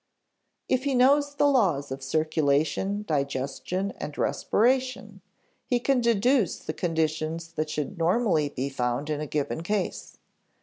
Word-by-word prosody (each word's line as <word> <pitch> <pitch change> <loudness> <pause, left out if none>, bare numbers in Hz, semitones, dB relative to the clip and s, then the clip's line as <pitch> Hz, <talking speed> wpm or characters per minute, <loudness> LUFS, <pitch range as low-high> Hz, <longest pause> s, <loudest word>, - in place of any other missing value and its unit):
If 260 +1 0
he 275 -2 +1
knows 285 +3 +4
the 290 0 +3
laws 180 - +2
of 135 +1 -5
circulation, 155 +7 0
digestion, 140 +6 -2
and 150 - -6
respiration, 255 +3 0 0.5
he 245 - +2
can 260 +1 +2
deduce 235 - +2
the 155 - -6
conditions 160 0 -1
that 155 -1 -3
should 150 +5 -4
normally 170 -4 +2
be 135 -1 -3
found 135 +2 -2
in 150 0 -2
a 150 - -4
given 145 +2 -2
case. 200 +2 -3
165 Hz, 135 wpm, -26 LUFS, 145-235 Hz, 0.5 s, knows